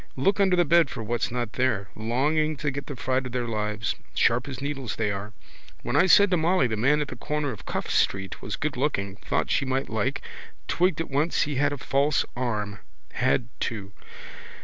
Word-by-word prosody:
Look 195 +10 +2
under 190 -2 +4
the 175 -1 +3
bed 165 -2 +5
for 115 - -5
what's 120 +2 -1
not 120 -2 -3
there. 115 -7 0
Longing 145 +7 +1
to 150 0 -1
get 140 +1 -6
the 145 - -5
fright 130 +1 -1
of 125 - -10
their 125 -1 -1
lives. 105 -1 -1 0.2
Sharp 120 +3 +3
as 135 - -6
needles 135 -5 -3
they 110 -2 0
are. 100 +2 -5 0.5
When - - -2
I 185 - +5
said 200 +1 +6
to 180 - +4
Molly 170 -1 +3
the 115 -3 0
man 140 +7 +3
at 145 - -3
the - - -6
corner 150 +3 -2
of 110 - -10
Cuffe - - -3
street 95 -1 0
was 100 - -3
goodlooking, 125 -10 -2
thought - - -1
she - - +2
might 135 0 -1
like, 110 -2 -1 0.4
twigged 175 -2 +2
at 165 - -5
once 150 +5 +2
he 145 -2 -2
had 145 +1 +2
a 145 - -3
false 140 +2 +1
arm. 105 -5 -2 0.3
Had, 125 -1 +1
too. 100 -3 -4
130 Hz, 205 wpm, -26 LUFS, 110-150 Hz, 0.5 s, said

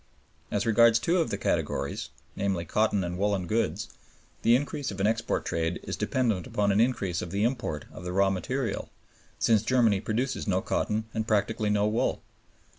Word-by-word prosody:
As 105 +2 -1
regards 115 0 +5
two 170 +9 +1
of 165 - +1
the - - -2
categories, - - -1 0.3
namely, 95 -4 -1
cotton 105 +2 +1
and 90 +1 -4
woolen 100 -2 +1
goods, 105 0 -1 0.5
the 115 - +5
increase 145 +1 -2
of 100 - -6
an 95 - +2
export 115 +2 0
trade 80 +1 -1
is - - -4
dependent 110 -9 0
upon 100 -1 +1
an 100 +3 +3
increase 100 -8 0
of 90 - -5
the 100 +4 -1
import 115 - -1
of - - -9
the 90 - -4
raw 95 +1 +3
material, 115 +4 -2 0.5
since 110 -3 +3
Germany 110 -4 +3
produces 120 +3 -2
no 95 -2 +2
cotton 105 +3 -1
and 110 0 -2
practically 105 0 +1
no 105 0 +2
wool. 110 +2 0
105 Hz, 180 wpm, -28 LUFS, 95-115 Hz, 0.5 s, regards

